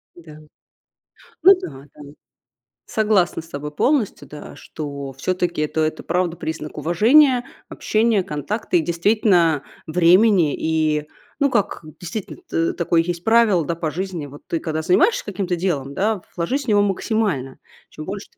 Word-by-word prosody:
Да. 160 -3 -13 1.1
Ну 385 - +9
да 135 -3 -8
да. - - -13 0.9
Согласна 210 -7 +1
с 165 - -16
тобой 150 0 -6
полностью, 250 - 0
да, 150 0 -10
что 140 -3 -7
все-таки 175 +4 -2
это 155 +1 -1
это 155 0 -2
правда 175 0 -1
признак 155 -1 -6
уважения, 240 - +4 0.2
общения, 220 -2 +1
контакта 175 - -2
и - - +3
действительно 170 -2 +2 0.2
времени. 175 0 +4
И 155 -2 0 0.3
ну, 280 -1 +3
как, 205 -5 -1 0.2
действительно, 185 +4 -6
т 165 0 0
такое 170 -1 +1
есть 170 0 -4
правило, 220 -7 +4
да, 170 - -2
по 165 -1 -3
жизни: 180 -3 -4
вот 145 +1 -13
ты 165 - -2
когда 160 -1 -3
занимаешься 355 - +3
каким-то 195 -3 -2
делом, 155 -7 -2
да, 210 0 0 0.2
вложись 260 +12 -1
в - - -16
него 205 -2 +4
максимально. 195 - -1 0.3
Чем 155 - -9
больше 200 +3 -6
ты - - -35
175 Hz, 150 wpm, -21 LUFS, 155-210 Hz, 1.1 s, Ну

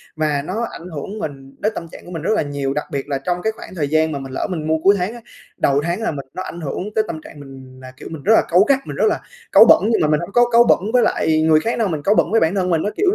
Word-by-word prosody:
mà 150 -2 0
nó 215 +10 -3
ảnh 175 - -10
hưởng 180 +7 -6
mình 135 -5 -7
đến 215 - 0
tâm 170 - -6
trạng - - -12
của 175 - -11
mình 165 -3 -5
rất 170 - -1
là - - +1
nhiều. 140 -2 -3
Đặc 150 - -3
biệt 140 -2 -3
là 140 - 0
trong 175 +6 -3
cái 220 - 0
khoảng 185 - -11
thời 150 -5 -1
gian 155 +1 +2
mà 140 - -3
mình 135 -1 -8
lỡ - - -2
mình 160 -4 -4
mua 160 0 +2
cuối 200 +1 +6
tháng 185 +4 -2
á, 240 - -9 0.4
đầu 140 +1 +2
tháng 175 +6 -2
là 225 - -1
mình 140 -3 -7
nó 185 - -5
ảnh 170 -2 -8
hưởng 180 +8 -5
tới 220 - +3
tâm 155 - -6
trạng 150 - -13
mình 135 -2 -12
là, 130 0 -10
kiểu, - - -9
mình 155 -4 -8
rất 220 - +4
là - - +4
cáu 175 - +5
gắt, 275 -1 +4
mình - - -6
rất - - +1
là - - 0 0.3
cáu - - +8
bẩn. - - +7
Nhưng - - +2
mà 155 - +3
mình 150 0 +2
hông 175 +3 -6
có 240 0 +4
cáu 235 0 +6
bẩn - - +4
với 250 - +5
lại 155 0 +1
người 155 -1 +4
khác 230 +9 -2
đâu, 225 - +2
mình 155 -5 -3
cáu 205 +5 +3
bẩn - - +2
với 225 - +4
bản 165 +4 +1
thân 185 -2 0
mình, 165 -2 +1
á, 205 - -1
kiểu, 400 - +3
160 Hz, 335 wpm, -19 LUFS, 145-200 Hz, 0.4 s, cáu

